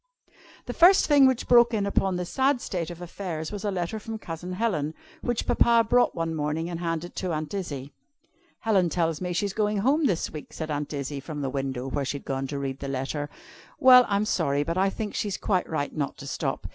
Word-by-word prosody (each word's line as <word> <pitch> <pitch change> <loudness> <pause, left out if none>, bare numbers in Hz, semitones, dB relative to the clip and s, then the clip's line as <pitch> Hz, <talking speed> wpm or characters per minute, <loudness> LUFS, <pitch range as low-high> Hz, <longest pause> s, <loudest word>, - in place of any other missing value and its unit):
The - - -4
first 360 +3 +6
thing 285 -3 +6
which 260 -2 0
broke 240 -1 +6
in 205 -2 0
upon 195 -2 +1
this 180 -1 -4
sad 270 0 +2
state 175 -8 -3
of 175 0 -8
affairs, 170 -3 -5
was 205 -2 -6
a 210 - 0
letter 190 +3 -2
from 225 +1 -6
Cousin 175 -2 -6
Helen, 170 -8 -1 0.3
which 240 -2 -1
Papa 235 -1 +4
brought 245 +1 +3
one 165 -1 -2
morning 160 +2 -2
and 170 - -4
handed 170 0 -3
to 185 -2 -2
Aunt 155 +1 -3
Izzie. 145 -8 -5 0.7
"Helen 195 -6 +2
tells 165 -1 -1
me 180 -1 -2
she's 195 +3 -1
going 210 0 0
home 275 +8 +3
this 180 -7 -1
week," 150 - -9
said 160 -1 -5
Aunt 145 0 -3
Izzie, 140 -1 -4
from 145 +1 -6
the 135 -2 -2
window, 135 -2 -3
where 140 +1 -2
she 135 +2 -2
had - - -14
gone 135 0 -2
to 140 +1 -4
read 135 -1 -4
the 140 - -5
letter. 135 +2 -3 0.5
"Well, 255 -4 +8
I'm 205 +1 +1
sorry, 145 -8 +1
but 165 +3 -2
I 190 +1 +3
think 210 +1 -5
she's 205 -3 -2
quite 185 -4 0
right 150 -3 -2
not 145 -3 -2
to 140 - -9
stop. - - -3
175 Hz, 220 wpm, -26 LUFS, 150-210 Hz, 0.7 s, Well